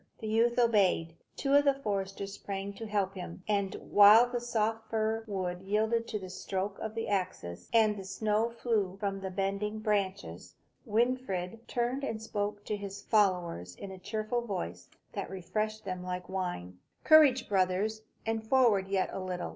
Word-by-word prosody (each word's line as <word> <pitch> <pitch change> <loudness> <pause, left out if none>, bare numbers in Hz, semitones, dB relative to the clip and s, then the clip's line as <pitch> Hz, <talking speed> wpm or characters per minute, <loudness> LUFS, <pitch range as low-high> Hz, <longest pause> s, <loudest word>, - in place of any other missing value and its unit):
The - - -8
youth 230 +3 +2
obeyed; 200 -8 +3 0.2
two 275 -1 0
of 285 0 +7
the 280 -1 +3
foresters 200 -5 -3
sprang 200 0 -5
to 225 +3 -7
help 200 -2 0
him; 180 -1 -8
and 200 -2 0
while 210 +4 +7
the 245 0 -2
soft 225 -2 -1
fir 220 0 0
wood 185 -3 -3
yielded 220 +4 0
to 215 - -2
the 190 -2 -7
stroke 195 +1 -3
of 220 0 -5
the 225 - -2
axes, 180 - -3
and 220 -2 +4
the 195 - -6
snow 210 +4 0
flew 220 -5 -1
from 195 -1 -2
the 190 0 -4
bending 195 +3 -2
branches, 200 -2 -2 0.3
Winfried 225 -3 -1
turned 245 +3 -1
and 225 -5 -2
spoke 205 -1 -3
to 210 - -1
his 200 -1 -7
followers 180 - +1
in 200 - -8
a 190 - -9
cheerful 215 +5 -2
voice, 90 - -5 0.2
that - - -4
refreshed 215 +4 -3
them 185 -2 -4
like 180 0 -4
wine. 175 - -4 0.2
"Courage, 290 -6 +6
brothers, 195 +3 +1 0.2
and 225 0 -1
forward 225 -7 +4
yet 195 -1 0
a - - -3
little! 185 -1 -4
205 Hz, 170 wpm, -31 LUFS, 190-225 Hz, 0.3 s, of